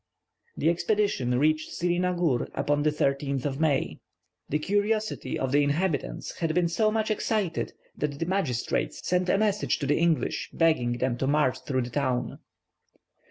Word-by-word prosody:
The 165 - +3
expedition 175 - +1
reached 155 +3 +2
Sirinagur 175 -5 0
upon 145 +1 +1
the 150 - +3
13th 140 -2 -1
of 140 -1 -2
May. 150 -4 +1 0.5
The 150 - +1
curiosity 205 +6 -1
of 130 -1 -2
the 145 +1 +4
inhabitants 150 +2 -1
had 165 -1 0
been 175 -1 +3
so 215 +6 +2
much 220 0 0
excited 210 -5 -1 0.2
that 145 -1 -2
the 165 - -2
magistrates 165 -10 -1
sent 180 0 +1
a - - +4
message 210 -1 +1
to 145 - -3
the 145 - +2
English 165 -2 +1
begging 155 -8 +2
them 120 0 -1
to 135 - 0
march 145 -3 +2
through 130 -3 +1
the 120 - -7
town. 130 -2 -1
155 Hz, 160 wpm, -27 LUFS, 140-180 Hz, 0.5 s, the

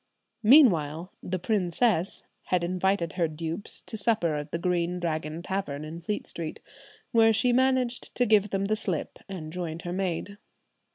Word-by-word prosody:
Meanwhile 185 - +5
the 185 +1 -2
"princess" 190 0 +1 0.2
had 180 -2 +1
invited 180 -1 0
her 175 -3 +1
dupes 165 +4 -4
to 220 - -5
supper 205 -7 +2
at 150 0 -5
the - - -1
Green 175 0 0
Dragon 160 -1 -3
Tavern 180 -7 -3
in 165 +2 -7
Fleet 205 +5 -3
Street, 160 -2 -5 0.5
where 225 -2 +6
she 245 +3 +3
managed 260 -1 +1
to 245 - +3
give 210 -2 +4
them 195 0 -1
the 215 +2 +1
slip 185 -7 -3
and 160 -5 -6
joined 170 -2 -4
her 175 - -4
maid. 190 +2 -3
180 Hz, 160 wpm, -27 LUFS, 165-210 Hz, 0.5 s, where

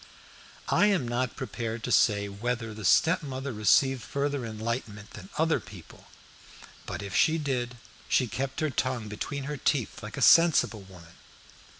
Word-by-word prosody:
I 205 - +4
am 185 -12 +1
not 120 +1 -2
prepared 115 -3 -5
to - - -3
say 100 -2 +3
whether 115 +2 -3
the 110 0 -9
stepmother 140 - +2
received 125 +5 +3
further 140 -1 -2
enlightenment 110 -1 -5
than - - -11
other 160 0 +2
people, 90 -6 -14 0.8
but - - -5
if 100 -2 -6
she 160 +1 +4
did 125 -5 -2 0.3
she 130 - +3
kept 130 +6 -4
her 155 -2 0
tongue 130 -4 -2
between 140 +7 -5
her 145 +1 -4
teeth 130 -2 -1
like 105 -1 -8
a - - 0
sensible 165 -10 +5
woman. 90 -3 -15
125 Hz, 155 wpm, -28 LUFS, 110-140 Hz, 0.8 s, sensible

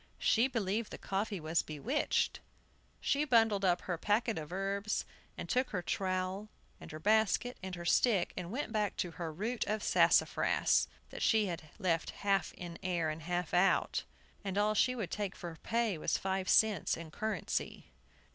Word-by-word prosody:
She 235 +3 +3
believed 220 -3 -1
the - - -7
coffee 200 0 -2
was 160 +1 +1
bewitched. 215 - -1 0.6
She 285 +1 +2
bundled 225 -7 +3
up 180 -2 +3
her 175 -3 -3
packets 215 +1 +1
of 150 - -9
herbs, 200 +2 -1 0.3
and - - -5
took 255 0 +1
her 180 -3 -3
trowel, 185 +2 -2 0.3
and - - -10
her 155 - -6
basket, 220 +6 +2
and 185 -1 -5
her 175 0 -7
stick, 195 0 +3
and 180 -2 -5
went 255 0 -3
back 210 -3 -1
to 175 - -2
her 165 -1 -5
root 220 +9 -2
of 215 0 -2
sassafras, - - +3 0.2
that - - -7
she 220 -2 +4
had 165 -4 -5
left 170 -5 0 0.2
half 195 -3 +2
in 170 -1 -8
the - - -13
air 170 -4 0
and 155 +1 -7
half 175 +1 -2
out. 180 +2 +3 0.4
And 195 -1 -3
all 210 +1 +3
she 250 +4 +3
would 220 -7 -4
take 205 -3 -3
for 170 -2 -7
pay 230 -7 0
was - - 0
five 190 -1 -2
cents 215 -5 +3
in 165 -1 -8
currency. 215 0 -3
195 Hz, 175 wpm, -33 LUFS, 175-220 Hz, 0.6 s, she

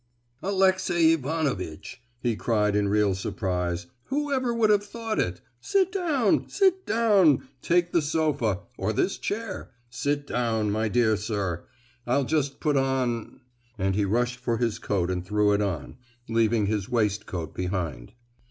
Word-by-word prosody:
"Alexey 190 -4 +3
Ivanovitch!" 130 - -3 0.2
he 120 -2 0
cried 105 -2 +1
in 105 -1 +2
real 105 -1 +3
surprise; 90 -2 -2 0.2
"who 290 +1 -2
ever 255 -3 +1
would 230 -2 +3
have 205 -1 +3
thought 225 +1 -4
it! 90 0 -1 0.2
Sit 380 - +1
down—sit 365 - +1
down—take 175 - +3
the 170 - +3
sofa—or 130 - -1
this 190 - 0
chair,—sit 140 - -4
down, 110 -5 0
my 110 +2 0
dear 110 0 +3
sir! 100 -5 -3 0.4
I'll 130 +3 +2
just 140 -1 -1
put 150 -3 +1
on——" 130 -4 -1 0.4
and 95 +1 0
he 105 +2 +1
rushed 120 +5 0
for 120 -2 -1
his 115 -2 -1
coat 95 -3 -1
and 90 -1 -2
threw 105 +2 +2
it 100 - +2
on, 90 - -3 0.3
leaving 115 -1 +2
his 100 -1 -1
waistcoat 100 -8 -1
behind. 90 - -3
120 Hz, 135 wpm, -26 LUFS, 100-165 Hz, 0.4 s, Alexey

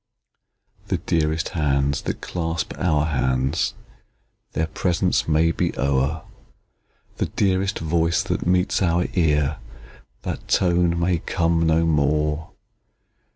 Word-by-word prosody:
The - - 0
dearest 80 -1 0
hands 70 -3 0
that - - -4
clasp 80 -2 -3
our 75 -5 +2
hands, 65 -3 0 0.8
Their 80 - 0
presence 90 +3 0
may 80 +1 +3
be - - -2
o'er; 70 +3 0 0.9
The - - 0
dearest 95 0 0
voice 80 +1 +1
that - - -2
meets 90 +2 +2
our 85 -1 +2
ear, 75 -5 +2 0.7
That - - -5
tone 85 -2 +2
may 85 0 +1
come 85 -1 +1
no 80 +1 +3
more! 75 0 +1
80 Hz, 110 wpm, -23 LUFS, 75-85 Hz, 0.9 s, may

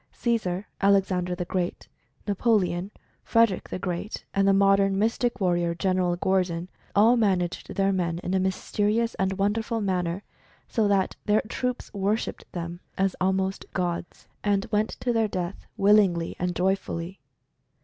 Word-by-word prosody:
Caesar, 210 -5 -1
Alexander 190 -2 +2
the 180 0 -3
Great, 180 -1 -3 0.4
Napoleon, 200 -3 +1 0.3
Fred 230 -2 +4
erick 185 - -6
the - - -3
Great, 180 +3 -4
and 195 0 +2
the - - +6
modern 195 0 +4
Mystic 230 +3 0
Warrior, 175 -3 +1
Gen. 185 -1 +1
Gordon, 180 -2 0 0.3
all 220 +4 +6
managed 190 -6 0
their 195 0 +2
men 170 -3 -1
in 180 - -2
a 190 - +3
mysterious 210 +4 0
and 190 0 +1
wonderful 210 +4 0
manner, 185 -2 -1 0.4
so 220 -4 +1
that 195 -2 +1
their 210 +1 +3
troops 250 +2 -3
worshiped 205 +3 -2
them 170 0 -5 0.2
as 195 -1 +1
almost 190 +1 0
gods, 175 -2 -3 0.2
and 200 -1 +1
went 210 +1 +2
to 245 - +1
their 225 -1 +2
death 180 -2 -4
willingly 195 -5 +4
and 180 0 -1
joyfully. 190 -1 -1
195 Hz, 145 wpm, -26 LUFS, 180-205 Hz, 0.4 s, the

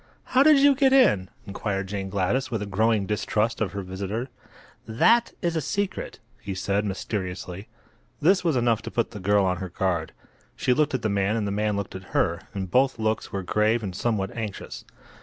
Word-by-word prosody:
"How 260 - +6
did 305 +1 +7
you 280 +1 +6
get 270 -1 +3
in?" 105 - +4 0.2
inquired 100 -1 -3
Jane 95 0 -4
Gladys, 100 +7 0
with 110 -4 -2
a - - -4
growing 105 +1 +1
distrust 105 +2 -1
of 100 -4 -1
her 100 -1 -4
visitor. 100 +7 -4 0.6
"That 230 - +3
is 170 -1 0
a 160 - 0
secret," 200 +7 -3 0.2
he 100 -1 -5
said, 100 +2 0
mysteriously. 95 -1 -4 0.5
This 190 +5 +3
was 165 -5 +1
enough 120 -2 +2
to - - -6
put 115 - -1
the 105 - -8
girl 100 +1 +3
on 90 -1 0
her 95 0 -5
guard. 85 -3 -1 0.4
She 125 - +2
looked 145 0 +1
at 130 - -3
the 110 - +1
man 100 +1 +1
and 110 -2 -1
the 100 - -2
man 105 +1 0
looked 100 -2 -4
at 95 -1 -10
her, - - +1
and 95 -3 -5
both 130 +3 +3
looks 110 0 -1
were 100 -1 -3
grave 110 +5 +1
and 95 -3 -4
somewhat 100 -4 -1
anxious. 110 -4 -6
105 Hz, 200 wpm, -25 LUFS, 95-120 Hz, 0.6 s, did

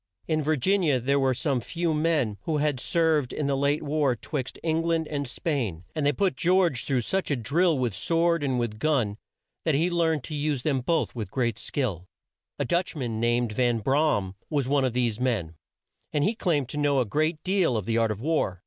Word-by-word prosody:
In 155 -1 +1
Vir 155 +1 +1
gin 195 +9 +2
i 170 - +1
a 135 -4 +3
there 140 +3 +1
were 130 -1 +2
some 135 -1 0
few 165 +6 -1
men 150 - +1
who 160 -2 0
had 145 -3 0
served 160 -3 +1
in 150 - -2
the 140 0 +1
late 140 +3 +1
war 145 -3 +1
'twixt 130 +2 -5
Eng 160 0 +1
land 165 -1 0
and 145 -2 -3
Spain, 120 - -2
and 155 - -2
they 145 - +4
put 185 +2 0
George 170 -3 +2
through 130 -3 +1
such 190 +11 -1
a 145 - +2
drill 155 +7 +2
with 125 -5 0
sword 165 - +1
and 130 -3 0
with 110 -3 -3
gun 120 -9 +1 0.4
that 160 -3 +2
he 165 +5 +2
learned 160 -4 +1
to 155 - -7
use 145 -3 -1
them 140 -4 +1
both 160 +4 0
with 110 -6 -5
great 115 -1 -1
skill. 110 - -3 0.5
A - - -1
Dutch 175 0 0
man, 120 -6 -3
named 120 0 +1
Van 120 +1 +1
Bra 140 +7 +2
am, 95 -2 -5 0.2
was 145 -5 0
one 140 -1 +2
of 125 - -1
these 120 -3 0
men, 115 -11 -1 0.6
and 145 - +1
he 210 - +2
claimed 155 - 0
to - - -6
know 145 -2 +2
a 125 - +2
great 155 +8 0
deal 185 - +2
of 105 - -3
the 115 +1 +1
art 115 -1 +2
of 105 -1 -3
war. 130 - 0
140 Hz, 225 wpm, -26 LUFS, 120-160 Hz, 0.6 s, they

